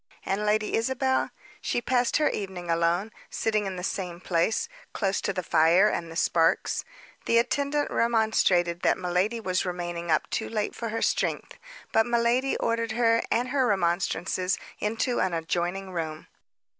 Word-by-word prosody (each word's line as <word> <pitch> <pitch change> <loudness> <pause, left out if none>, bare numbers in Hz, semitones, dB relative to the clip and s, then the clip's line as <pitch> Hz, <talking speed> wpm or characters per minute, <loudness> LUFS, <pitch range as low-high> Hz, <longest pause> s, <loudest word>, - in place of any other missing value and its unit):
And 210 +2 -1
Lady 215 0 +1
Isabel? 260 +3 +1 0.3
She - - 0
passed 245 0 +1
her 300 - +3
evening 185 -4 -3
alone, 170 +5 +1 0.2
sitting 215 -2 0
in 190 - -4
the 180 - -6
same 180 -2 -3
place, 175 +3 0 0.3
close 195 -2 0
to - - -1
the 185 -1 -3
fire 170 +6 +4
and 170 -4 -3
the - - -9
sparks. 165 -1 +2 0.4
The 230 - +3
attendant 280 +5 +1
remonstrated 220 -7 +2
that - - +3
miladi 185 +6 0
was 185 -4 0
remaining 175 -2 -4
up 155 - +2
too 220 - -2
late 215 -2 -2
for 230 -1 -4
her 225 +1 -2
strength, - - 0 0.4
but 225 +1 +3
miladi 240 +3 +2
ordered 230 -1 0
her 230 0 +3
and 245 +2 +1
her 265 -1 +2
remonstrances 185 -1 0 0.2
into 225 +3 0
an 185 -2 +1
adjoining 175 +3 -2
room. 160 -3 -4
200 Hz, 155 wpm, -27 LUFS, 175-230 Hz, 0.4 s, fire